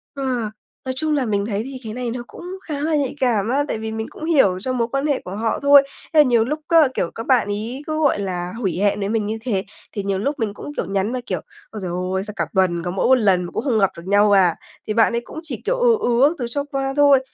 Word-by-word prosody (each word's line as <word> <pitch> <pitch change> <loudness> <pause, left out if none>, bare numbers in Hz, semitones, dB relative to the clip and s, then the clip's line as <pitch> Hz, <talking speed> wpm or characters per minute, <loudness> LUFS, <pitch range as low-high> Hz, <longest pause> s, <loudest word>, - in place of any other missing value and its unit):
Ờ, 275 - -4 0.6
nói 260 - -2
chung 310 +2 0
là 275 -3 +1
mình 205 -2 0
thấy 205 -1 -2
thì 265 +2 -7
cái 220 -1 -6
này 245 -1 -3
nó 245 0 -5
cũng - - -12 0.3
khá 295 -2 -3
là 315 +1 +1
nhạy 285 -3 -1
cảm 230 -5 +1
á, 280 +3 +2
tại - - -2
vì 220 0 -5
mình 220 0 -4
cũng 315 - -8
hiểu 265 - +3
cho 255 +7 -2
mối 235 -2 0
quan 275 +1 0
hệ 285 -3 0
của 185 - -6
họ 220 +1 -1
thôi. 280 0 +7 0.3
Thế 315 - +5
là - - +10
nhiều 240 -5 +3
lúc 300 +5 -2
á, 330 -4 +6
kiểu, 170 - -1
các 225 - -6
bạn 250 -5 +3
ấy 220 +7 -4
cứ, 310 0 -1
gọi 285 -8 +2
là, 180 -2 -3
hủy 190 -8 -1
hẹn 205 0 +2
với 200 - -2
mình 220 -1 0
như 220 +1 -2
thế, 215 -6 -1 0.3
thì 205 - -3
nhiều 195 -1 -1
lúc 280 +7 -2
mình 215 -3 -1
cũng, 290 - -8
kiểu, - - -2
nhắn 195 +3 -1
mà 255 - -2
kiểu 185 -3 -2 0.3
"Ôi 215 - -7
trời 180 - -3 0.2
ơi! 190 - 0
Sao 210 +1 -8
cả - - -1
tuần 175 -3 +2
có 175 - -2
mỗi 190 - -1
1 260 - +7
lần 195 -7 +3
mà 175 - -6
cũng - - -3
không 245 -6 +1
gặp 195 -2 +4
được 170 - -9
nhau 205 +1 +4
à?" 185 -4 +5 0.3
Thì 215 - -1
bạn 230 +1 +3
ấy 235 - 0
cũng - - -8
chỉ, 320 - -6
kiểu, - - 0
ừ, 485 -2 +5
ừ 245 - +4
các 320 - -1
thứ 245 - -1
cho 285 +3 -2
qua 270 -2 -3
thôi. 285 -2 +6
230 Hz, 295 wpm, -21 LUFS, 200-275 Hz, 0.6 s, là